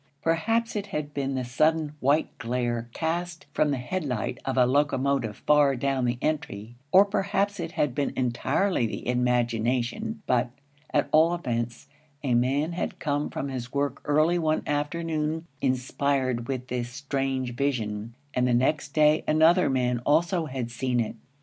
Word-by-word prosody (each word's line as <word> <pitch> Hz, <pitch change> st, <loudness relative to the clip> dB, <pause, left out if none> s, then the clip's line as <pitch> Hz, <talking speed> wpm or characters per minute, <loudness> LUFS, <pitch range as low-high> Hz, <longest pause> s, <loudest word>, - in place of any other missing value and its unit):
Perhaps 225 Hz, +9 st, +1 dB
it 205 Hz, -1 st, -2 dB
had 150 Hz, -5 st, -4 dB
been 135 Hz, -1 st, -2 dB
the 130 Hz, -, -1 dB
sudden 155 Hz, +4 st, +1 dB
white 145 Hz, +4 st, +1 dB
glare 120 Hz, 0 st, -2 dB
cast 170 Hz, +2 st, -3 dB
from 150 Hz, -, +2 dB
the 140 Hz, -, 0 dB
headlight 125 Hz, -4 st, -3 dB
of 135 Hz, -1 st, -2 dB
a 125 Hz, -, +6 dB
locomotive 135 Hz, -4 st, +1 dB
far 145 Hz, -2 st, +5 dB
down 135 Hz, 0 st, 0 dB
the 120 Hz, 0 st, 0 dB
entry, 120 Hz, -7 st, -3 dB, 0.2 s
or 190 Hz, +3 st, +8 dB
perhaps 200 Hz, 0 st, 0 dB
it 165 Hz, -1 st, -4 dB
had 145 Hz, -4 st, 0 dB
been 140 Hz, +2 st, -1 dB
entirely 125 Hz, -, +1 dB
the -, -, -6 dB
imagination, 125 Hz, -, 0 dB
but, 125 Hz, -1 st, +2 dB, 0.4 s
at 145 Hz, -2 st, +2 dB
all 165 Hz, +3 st, +5 dB
events, 120 Hz, -7 st, -3 dB, 0.4 s
a 130 Hz, -3 st, +1 dB
man 135 Hz, +7 st, +2 dB
had 170 Hz, -, -3 dB
come 145 Hz, -1 st, -1 dB
from 140 Hz, -, -4 dB
his 125 Hz, -2 st, -5 dB
work 140 Hz, -1 st, -1 dB
early 155 Hz, +4 st, +3 dB
one 155 Hz, -1 st, +1 dB
afternoon 155 Hz, +1 st, -1 dB, 0.2 s
inspired 130 Hz, -1 st, 0 dB
with 130 Hz, -2 st, -3 dB
this 120 Hz, -1 st, -3 dB
strange 135 Hz, -1 st, -2 dB
vision, 115 Hz, -4 st, -2 dB, 0.2 s
and 125 Hz, 0 st, +2 dB
the 125 Hz, -, +3 dB
next 140 Hz, +3 st, 0 dB
day 155 Hz, 0 st, +4 dB
another 160 Hz, +4 st, +5 dB
man 125 Hz, -2 st, +1 dB
also 165 Hz, +6 st, +2 dB
had 130 Hz, -3 st, -4 dB
seen 125 Hz, 0 st, -1 dB
it. 115 Hz, 0 st, -1 dB
140 Hz, 155 wpm, -26 LUFS, 125-155 Hz, 0.4 s, or